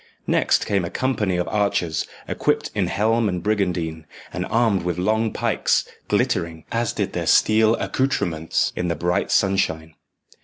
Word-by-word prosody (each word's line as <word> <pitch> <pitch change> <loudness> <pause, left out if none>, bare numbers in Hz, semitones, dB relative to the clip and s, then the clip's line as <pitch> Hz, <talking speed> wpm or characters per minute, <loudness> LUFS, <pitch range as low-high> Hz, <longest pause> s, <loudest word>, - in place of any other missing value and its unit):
Next - - +2
came 100 -3 0
a 85 - -3
company 105 -8 -1
of 90 - -1
archers, 100 -6 0 0.2
equipped - - 0
in - - 0
helm 110 +1 +1
and 90 -2 -3
brigandine, 90 -7 -1 0.3
and 90 0 -3
armed 110 -4 +2
with 90 0 -2
long 110 +4 +1
pikes, - - 0 0.2
glittering, 80 -2 -1
as 115 -1 0
did - - -3
their - - -3
steel 110 +1 +4
accoutrements, 85 - -1
in 90 - -2
the 85 - -1
bright 90 +5 0
sunshine. 80 -5 +1
95 Hz, 150 wpm, -22 LUFS, 85-110 Hz, 0.3 s, steel